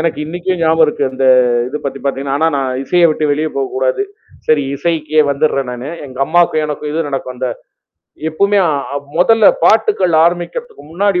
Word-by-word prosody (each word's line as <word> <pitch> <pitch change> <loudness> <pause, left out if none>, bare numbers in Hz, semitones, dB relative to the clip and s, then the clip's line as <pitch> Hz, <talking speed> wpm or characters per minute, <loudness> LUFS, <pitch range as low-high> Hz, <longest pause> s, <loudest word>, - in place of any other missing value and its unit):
எனக்கு 165 - -1
இன்னைக்கும் 175 +2 -3
ஞாபகம் 160 0 +4
இருக்கு. 150 -1 -2
அந்த 135 0 -2 0.4
இத 150 +3 -4
பத்தி 135 0 -4
பாத்தீங்கன்னா, 140 0 -2
ஆனா 160 +1 +3
நான் 130 -1 -2
இசைய 175 +3 +3
விட்டு 155 0 -1
வெளிய 155 +2 -1
போகக்கூடாது. 130 - -1 0.4
சரி, 155 -2 +3
இசைக்கே 155 0 0
வந்துட்றேன் 140 -2 0
நானு. 125 +4 -6 0.2
எங்க 130 -1 -12
அம்மாக்கும் 170 -2 +2
எனக்கும் 150 0 -5
இது 160 -1 -1
நடக்கும். 130 -2 -4
அந்த 125 0 -2 0.8
எப்பவுமே 200 +5 +2 0.6
முதல்ல 225 +5 +4 0.2
பாட்டுகள் 185 - +3
ஆரம்பிக்கிறதுக்கு 180 - -3
முன்னாடி, 195 0 +1
155 Hz, 155 wpm, -15 LUFS, 135-175 Hz, 0.8 s, ஞாபகம்